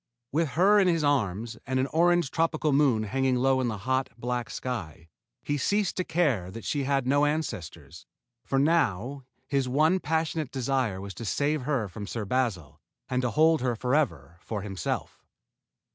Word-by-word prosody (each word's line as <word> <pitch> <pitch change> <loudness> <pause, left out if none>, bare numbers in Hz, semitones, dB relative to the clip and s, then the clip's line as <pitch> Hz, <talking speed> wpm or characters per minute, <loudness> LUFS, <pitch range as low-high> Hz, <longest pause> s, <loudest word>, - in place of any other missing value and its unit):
With 160 +3 +1
her 200 +4 +6
in 195 - +4
his 165 -3 +2
arms 115 -5 0
and 130 0 0
an 130 - +2
orange 175 -2 +3
tropical 160 -2 +1
moon 135 -6 +3
hanging 130 +4 0
low 130 +1 +2
in 125 - 0
the 110 -3 -2
hot, 130 +6 -1
black 120 0 -3
sky, 85 - -5 0.3
he 145 0 -1
ceased 205 +4 +1
to 185 - +1
care 140 - 0
that 115 +4 -9
she 140 -2 -1
had 135 -1 +1
no 145 +3 +3
ancestors, 85 - -4 0.4
for 135 - -1
now 135 - +1 0.2
his 135 -2 0
one 155 +8 +3
passionate 160 -2 -1
desire 130 -6 -1
was 100 0 -7
to 115 - -8
save 145 +7 0
her 125 -5 -1
from 100 +2 -8
Sir 110 -2 -4
Basil 105 - -2 0.3
and 125 0 0
to 125 - 0
hold 160 +5 +3
her 125 -2 0
forever 110 - -1
for 105 -3 -5
himself. 95 -4 -4
130 Hz, 175 wpm, -27 LUFS, 110-150 Hz, 0.4 s, her